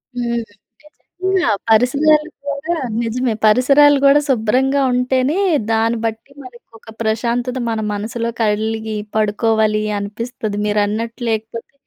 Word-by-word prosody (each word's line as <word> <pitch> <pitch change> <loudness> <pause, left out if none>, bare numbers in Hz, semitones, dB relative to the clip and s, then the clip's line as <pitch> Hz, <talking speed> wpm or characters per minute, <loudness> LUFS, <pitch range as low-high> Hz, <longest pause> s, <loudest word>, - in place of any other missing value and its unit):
హ్మ్. 235 -1 -2 0.8
నిజంగా 375 - +2 0.2
పరిసరాలు 300 +7 +3 0.2
కూడా 285 +4 -2 0.3
నిజమే 235 0 -1
పరిసరాలు 275 +6 +5
కూడా 280 +1 +6
శుభ్రంగా 265 +3 +1
ఉంటేనే 255 +5 +1 0.3
దాన్ని 225 +1 +1
బట్టి 225 +4 -4
మనకు 250 -2 -14
ఒక 220 - -21
ప్రశాంతత 235 +3 -1
మన 225 -1 -1
మనసులో 230 +3 -3
కలిగి 220 0 -1 0.2
పడుకోవాలి 215 0 +1 0.2
అనిపిస్తది. 210 +1 -5
మీరన్నట్టు 210 +3 -1
లేకపోతే 225 +2 -4
230 Hz, 105 wpm, -18 LUFS, 220-260 Hz, 0.8 s, కూడా